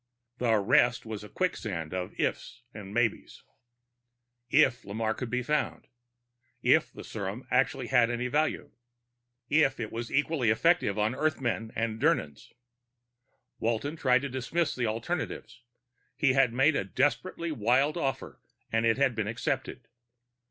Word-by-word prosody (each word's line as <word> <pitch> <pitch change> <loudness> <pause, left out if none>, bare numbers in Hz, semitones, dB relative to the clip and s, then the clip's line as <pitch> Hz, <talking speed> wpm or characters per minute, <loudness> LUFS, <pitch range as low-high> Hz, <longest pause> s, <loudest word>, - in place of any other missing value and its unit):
The 115 -3 +3
rest 115 +4 +3
was 110 -2 -6
a 105 - -10
quicksand 95 - -3
of 90 -1 -5
ifs 125 - -2
and 100 -3 -9
maybes. 115 0 -1 1.1
If 130 -4 +4
Lamarre 110 +2 -2
could 125 - -5
be 125 +1 -1
found.... 150 +3 -1 0.8
If - - +4
the - - -10
serum 105 +3 -6
actually 130 0 +1
had 120 -1 +3
any 120 +1 -2
value.... 145 +1 -1 0.8
If 145 -2 +3
it 110 -2 -4
was 115 0 -5
equally 145 -4 +1
effective 115 - +2
on 105 +2 +1
Earthmen 125 -7 -1
and 115 0 -2
Dirnans.... 105 - 0 1.1
Walton 115 +7 -1
tried 130 -4 +2
to 140 - -3
dismiss 135 +6 -1
the 120 -2 -1
alternatives. 120 +1 -4 0.6
He 135 -3 +3
had 135 -2 +4
made 135 +6 +3
a - - +1
desperately 145 - -1
wild 135 +4 +2
offer, 135 -5 -3 0.3
and 115 +1 +2
it 115 - +3
had 135 -2 +2
been 110 -2 -2
accepted. 120 +2 -3
125 Hz, 140 wpm, -29 LUFS, 110-140 Hz, 1.1 s, If